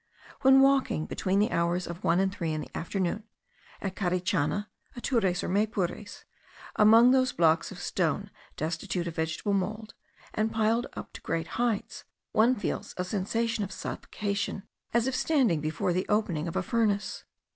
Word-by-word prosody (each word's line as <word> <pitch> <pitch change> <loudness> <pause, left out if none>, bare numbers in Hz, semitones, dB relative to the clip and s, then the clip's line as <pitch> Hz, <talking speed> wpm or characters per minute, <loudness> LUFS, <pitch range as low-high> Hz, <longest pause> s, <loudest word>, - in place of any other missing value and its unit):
When 265 0 +7
walking 270 - +3
between 190 +1 -1
the 210 +4 +2
hours 170 +1 +1
of 170 +1 -7
one 170 - +3
and 190 0 +1
three 170 -5 -2
in 155 - -2
the - - -10
afternoon, 190 +4 -2 0.6
at 190 -2 -3
Carichana, 180 0 0 0.3
Atures, 225 -8 0
or - - -2
Maypures, 205 0 -1 0.5
among 225 +4 +7
those 255 -1 +3
blocks 165 0 +3
of 190 - -9
stone 180 +2 -1 0.3
destitute 170 +3 -2
of 170 - -4
vegetable 160 +5 -1
mould, 210 +3 -2 0.4
and 215 +1 0
piled 225 +2 +1
up - - -8
to - - -9
great 165 0 -2
heights, 235 -2 -1 0.3
one 235 +4 +4
feels 205 - -4
a 180 - -1
sensation 215 +4 -1
of 195 - -5
suffocation, 200 -1 -3 0.3
as 235 0 +2
if 265 -1 -1
standing 255 - +2
before 155 +3 -1
the 185 +1 -1
opening 180 -7 0
of 165 - -5
a - - 0
furnace. 210 -3 0
200 Hz, 160 wpm, -28 LUFS, 175-225 Hz, 0.6 s, When